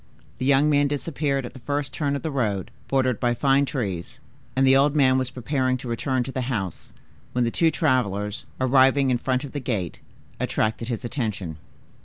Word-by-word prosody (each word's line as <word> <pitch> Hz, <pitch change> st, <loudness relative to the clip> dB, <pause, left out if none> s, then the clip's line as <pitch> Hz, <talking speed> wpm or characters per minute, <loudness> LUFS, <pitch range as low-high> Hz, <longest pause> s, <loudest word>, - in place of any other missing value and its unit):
The 130 Hz, -, -1 dB
young 140 Hz, +1 st, +5 dB
man 145 Hz, -1 st, +3 dB
disappeared 140 Hz, -2 st, -1 dB
at -, -, -8 dB
the 130 Hz, -, -11 dB
first 145 Hz, +2 st, -2 dB
turn 145 Hz, -3 st, -1 dB
of 140 Hz, -, -4 dB
the 160 Hz, -, -2 dB
road, 105 Hz, -9 st, -1 dB, 0.2 s
bordered 130 Hz, -4 st, +1 dB
by 120 Hz, -1 st, +1 dB
fine 140 Hz, +2 st, +3 dB
trees, 105 Hz, -, -4 dB, 0.4 s
and 135 Hz, +1 st, +3 dB
the 135 Hz, 0 st, +6 dB
old 140 Hz, +2 st, +4 dB
man 130 Hz, -3 st, +4 dB
was 130 Hz, -1 st, -1 dB
preparing 130 Hz, 0 st, 0 dB
to 125 Hz, -, -9 dB
return 125 Hz, +2 st, 0 dB
to 135 Hz, -, -6 dB
the 130 Hz, -, -2 dB
house, 95 Hz, -8 st, -3 dB, 0.4 s
when 125 Hz, -, +2 dB
the 115 Hz, -, 0 dB
two 165 Hz, +5 st, +3 dB
travelers, 105 Hz, -, 0 dB
arriving 130 Hz, +1 st, +4 dB
in 120 Hz, -, +1 dB
front 130 Hz, +1 st, 0 dB
of 140 Hz, -, -7 dB
the 145 Hz, -, -3 dB
gate, 110 Hz, -, -3 dB, 0.4 s
attracted 110 Hz, +1 st, -1 dB
his 120 Hz, -2 st, -3 dB
attention. 105 Hz, -, -3 dB
130 Hz, 195 wpm, -24 LUFS, 120-140 Hz, 0.4 s, the